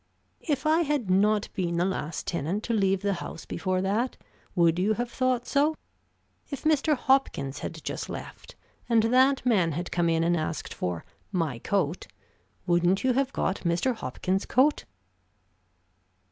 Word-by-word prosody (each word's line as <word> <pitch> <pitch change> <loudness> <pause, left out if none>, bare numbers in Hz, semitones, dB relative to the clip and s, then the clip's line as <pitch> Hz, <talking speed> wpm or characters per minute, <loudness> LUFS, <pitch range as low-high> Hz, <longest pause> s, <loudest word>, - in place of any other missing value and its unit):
"If 295 -3 -2
I 315 +2 +4
had 285 - 0
not 210 +2 +3
been 170 -2 -1
the 175 - +2
last 165 -4 -3
tenant 170 +5 -2
to 235 - -1
leave 195 -2 +2
the 200 -1 +1
house 165 - -7
before 185 -1 -1
that, 220 +6 0 0.4
would 170 -1 +3
you 205 +4 +2
have 240 +2 -3
thought 255 -2 0
so? 295 +3 +2 0.7
If 280 - -6
Mr. 310 -1 +3
Hopkins 245 - +1
had 160 -1 -6
just - - -4
left, - - -8 0.3
and 230 -2 +4
that 260 +3 +3
man 185 -10 +3
had 175 +4 -4
come 170 -1 +1
in 165 0 +2
and 170 +1 +2
asked 155 -1 -3
for 90 -2 -3 0.3
'My 160 - -1
coat,' 180 +1 -1 0.6
wouldn't 175 +2 +2
you 260 -1 +3
have 270 +1 +1
got 195 - -1
Mr. 170 +8 0
Hopkins' 190 - -2
coat?" 275 +4 +3
195 Hz, 160 wpm, -27 LUFS, 170-255 Hz, 0.7 s, I